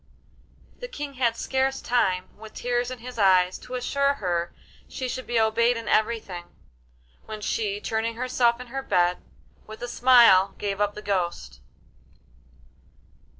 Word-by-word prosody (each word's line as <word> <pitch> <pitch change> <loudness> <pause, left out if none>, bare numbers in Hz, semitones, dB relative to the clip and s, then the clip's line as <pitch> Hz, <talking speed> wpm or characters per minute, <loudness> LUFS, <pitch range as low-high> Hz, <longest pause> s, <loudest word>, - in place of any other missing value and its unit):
The - - -6
King 295 - -6
had 240 -3 0
scarce 265 0 0
time, 190 -7 +1
with 220 0 -13
tears 245 0 -1
in 255 - -6
his 245 0 -9
eyes, 185 -2 +4
to 255 - -8
assure 280 +3 +1
her 175 -7 -2 0.4
she 260 - -5
should 255 +1 -5
be 240 -1 +1
obeyed 230 +2 +2
in 230 -2 -7
everything, 215 -6 0 0.8
when 215 -1 -6
she, 210 -1 -2
turning 225 +2 -2
herself 240 -1 +1
in 250 - -7
her 270 - -2
bed, 180 -7 +1 0.5
with 215 +2 -10
a - - -3
smile 235 -7 +5
gave 200 0 -3
up 205 0 0
the 210 - -8
ghost. 175 - -3
225 Hz, 150 wpm, -25 LUFS, 195-250 Hz, 0.8 s, smile